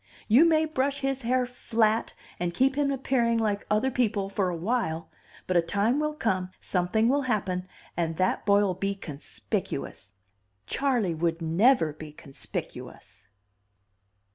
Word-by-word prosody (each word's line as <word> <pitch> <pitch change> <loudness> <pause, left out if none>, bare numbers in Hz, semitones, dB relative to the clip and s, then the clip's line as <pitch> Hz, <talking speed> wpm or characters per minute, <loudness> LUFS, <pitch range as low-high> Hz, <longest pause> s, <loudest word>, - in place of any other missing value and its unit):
You 245 +9 +6
may 315 -1 +4
brush 280 -2 -1
his 270 -1 -1
hair 250 +1 +1
flat 225 -2 0 0.2
and 175 -1 -2
keep 270 +1 +3
him 290 -1 +1
appearing 250 -3 +1
like 210 -3 -1
other 215 +5 +2
people 210 -6 0
for 195 -2 0
a 175 - -3
while, 165 -4 -2 0.3
but 185 - -1
a 175 - +6
time 205 - +1
will 305 0 -1
come, 185 -9 -1
something 190 +5 +1
will 280 +3 +3
happen, 190 -7 -1 0.3
and 165 -2 -1
that 185 0 +1
boy'll 200 -2 +3
be 195 +2 -2
conspicuous. 140 - -5 0.5
Charley 245 -10 0
would 165 +1 -1
never 165 - +3
be 155 0 -10
conspicuous." 135 -7 -8
210 Hz, 140 wpm, -27 LUFS, 180-255 Hz, 0.5 s, You